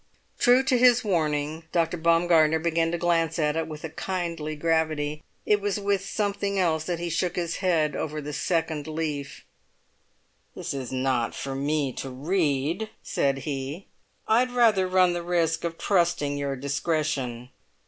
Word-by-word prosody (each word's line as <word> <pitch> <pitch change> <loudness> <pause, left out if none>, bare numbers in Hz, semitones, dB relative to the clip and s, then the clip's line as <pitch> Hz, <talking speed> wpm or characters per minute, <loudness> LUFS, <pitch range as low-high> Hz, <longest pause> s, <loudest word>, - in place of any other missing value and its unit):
True 250 +1 +5
to 260 -2 +2
his 245 -1 +5
warning, 155 -4 -1
Dr. 165 0 +1
Baumgartner 165 -1 +4
began 165 0 0
to 175 - -1
glance 165 -2 +1
at 150 -2 +1
it 165 -1 -1
with 155 -1 -8
a 160 - -4
kindly 170 -5 -3
gravity; 155 -1 0 0.2
it 210 -1 +3
was 205 0 -1
with 200 -1 0
something 200 -1 -2
else 160 -4 +1
that 175 0 -2
he 175 +1 -4
shook 175 +1 -1
his 170 -2 -2
head 160 -6 +1
over 155 0 -3
the 150 0 -6
second 160 +1 -1
leaf. 155 -3 -4 1.1
"This - - -4
is 130 -3 -5
not 130 -2 0
for 135 - -4
me 140 0 -1
to 135 - -4
read!" 155 +5 -1
said 135 -1 -1
he. 145 +4 -4 0.4
"I'd 240 +3 +3
rather 225 -6 +3
run 185 -1 +4
the 175 - -2
risk 170 -2 0
of 165 -1 -3
trusting 170 -7 +1
your 140 -1 -2
discretion." 140 -3 -2
165 Hz, 160 wpm, -26 LUFS, 150-180 Hz, 1.1 s, True